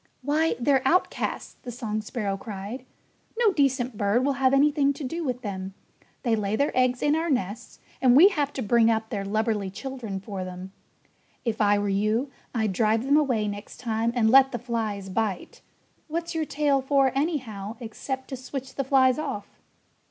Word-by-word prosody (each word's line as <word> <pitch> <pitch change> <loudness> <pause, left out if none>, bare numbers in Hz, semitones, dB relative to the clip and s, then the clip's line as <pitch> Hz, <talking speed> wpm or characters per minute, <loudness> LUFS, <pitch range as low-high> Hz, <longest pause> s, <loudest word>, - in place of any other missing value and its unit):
"Why, 305 +4 +1
they're 265 +1 +3
outcasts!" 360 +2 0
the - - -8
song 220 -3 -3
sparrow 210 -2 -3
cried. 215 +4 -7 0.5
"No 455 -4 +3
decent 260 - +1
bird 210 +5 +2
will 280 - +2
have 260 -1 +5
anything 280 0 +3
to 290 - -8
do 330 +6 -3
with 250 -3 -3
them. 190 -2 -5 0.5
They 235 -4 +2
lay 210 -1 -1
their 285 +5 0
eggs 255 -1 +2
in 295 +1 +3
our 330 +1 -1
nests 220 -6 -2 0.2
and 255 -2 +5
we 350 +8 +9
have 295 -7 -1
to 260 - -3
bring 230 +2 +4
up 220 -1 0
their 200 -3 -2
lubberly 215 -1 -1
children 235 -3 -5
for 195 -1 -6
them. 185 +1 -8 0.7
If 225 -1 -1
I 205 0 +4
were 205 0 -1
you 215 +7 0 0.2
I'd 220 -5 0
drive 220 +3 +2
them 280 +2 +3
away 250 -8 +2
next 205 0 -7
time 230 -1 0
and 220 -2 +3
let 270 0 +7
the 240 - -2
flies 220 -4 -3
bite. 195 -1 -3 0.5
What's 335 +2 -3
your 320 -1 -1
tail 285 -2 +1
for, 270 0 +3
anyhow, 240 - -2
except 260 +3 -5
to 270 - -4
switch 260 +1 -7
the 275 - -2
flies 260 0 +3
off?" 265 -10 -4
245 Hz, 180 wpm, -26 LUFS, 210-275 Hz, 0.7 s, we